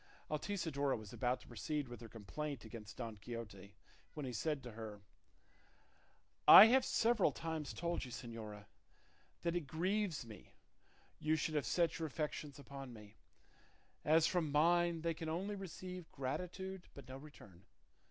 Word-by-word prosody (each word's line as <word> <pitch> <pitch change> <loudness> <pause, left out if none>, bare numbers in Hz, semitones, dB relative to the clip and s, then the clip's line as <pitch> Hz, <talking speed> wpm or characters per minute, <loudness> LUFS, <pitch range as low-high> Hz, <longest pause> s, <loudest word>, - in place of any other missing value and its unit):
Altisidora 150 -5 0
was 110 -3 -10
about 125 0 0
to - - -16
proceed 140 +5 -3
with 120 -2 -9
her 115 - -9
complaint 125 +4 -5
against 110 -2 -9
Don 115 -3 -5
Quixote, 100 -3 -8 0.4
when 150 - -4
he 125 - -4
said 145 +5 -1
to 120 - -7
her, 105 -2 -8 1.4
"I 195 - +14
have 260 +2 +5
several 235 -4 +3
times 160 -2 -4
told 170 -1 -2
you, 130 - -6
señora, 110 -4 -7 0.8
that 170 0 0
it 170 -5 -2
grieves 180 - 0
me 110 -2 -12 0.6
you 155 +1 +2
should 155 0 -1
have 150 -3 0
set 170 -3 +2
your 160 - -1
affections 150 -1 -4
upon 140 -2 -8
me, 105 -2 -13 0.9
as 160 +1 +5
from 170 -5 +1
mine 170 +2 +4
they 165 0 0
can 160 0 -5
only 190 +6 -2
receive 185 -2 -7
gratitude, 180 +7 -4
but 140 -3 -10
no 130 +1 -7
return. 105 - -14
150 Hz, 150 wpm, -38 LUFS, 115-170 Hz, 1.4 s, I